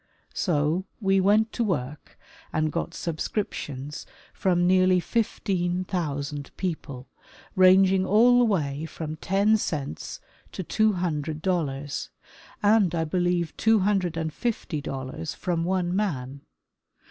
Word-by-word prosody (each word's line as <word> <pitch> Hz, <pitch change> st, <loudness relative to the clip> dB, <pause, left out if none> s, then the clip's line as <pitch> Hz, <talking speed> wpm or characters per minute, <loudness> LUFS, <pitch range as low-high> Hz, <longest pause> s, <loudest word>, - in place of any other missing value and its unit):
So 160 Hz, 0 st, +1 dB, 0.2 s
we 195 Hz, -3 st, +3 dB
went 215 Hz, +3 st, +3 dB
to 240 Hz, -, -1 dB
work 150 Hz, -, -3 dB, 0.3 s
and 155 Hz, 0 st, 0 dB
got 170 Hz, -, -3 dB
subscriptions 150 Hz, -5 st, -4 dB, 0.3 s
from 175 Hz, -2 st, +1 dB
nearly 185 Hz, 0 st, +4 dB
15,000 175 Hz, -, -2 dB
people, 145 Hz, -8 st, -4 dB, 0.5 s
rang 185 Hz, +1 st, +7 dB
ing 190 Hz, 0 st, +2 dB
all 235 Hz, +6 st, +5 dB
the 245 Hz, -, +5 dB
way 155 Hz, -8 st, -1 dB
from 160 Hz, -1 st, -6 dB
ten 200 Hz, +5 st, +2 dB
cents 145 Hz, -, -4 dB, 0.3 s
to 190 Hz, -, -4 dB
two 215 Hz, +4 st, +2 dB
hundred 155 Hz, -4 st, -2 dB
dollars, 145 Hz, -7 st, -2 dB, 0.5 s
and 205 Hz, -4 st, +4 dB
I 165 Hz, -, +1 dB
believe 175 Hz, +1 st, 0 dB
two 220 Hz, -2 st, +4 dB
hundred 185 Hz, -4 st, +1 dB
and 160 Hz, -1 st, -2 dB
fifty 210 Hz, -10 st, -3 dB
dollars 135 Hz, +4 st, -5 dB
from 170 Hz, -3 st, -1 dB
one 180 Hz, 0 st, 0 dB
man. 140 Hz, -9 st, -2 dB
175 Hz, 125 wpm, -26 LUFS, 150-195 Hz, 0.5 s, rang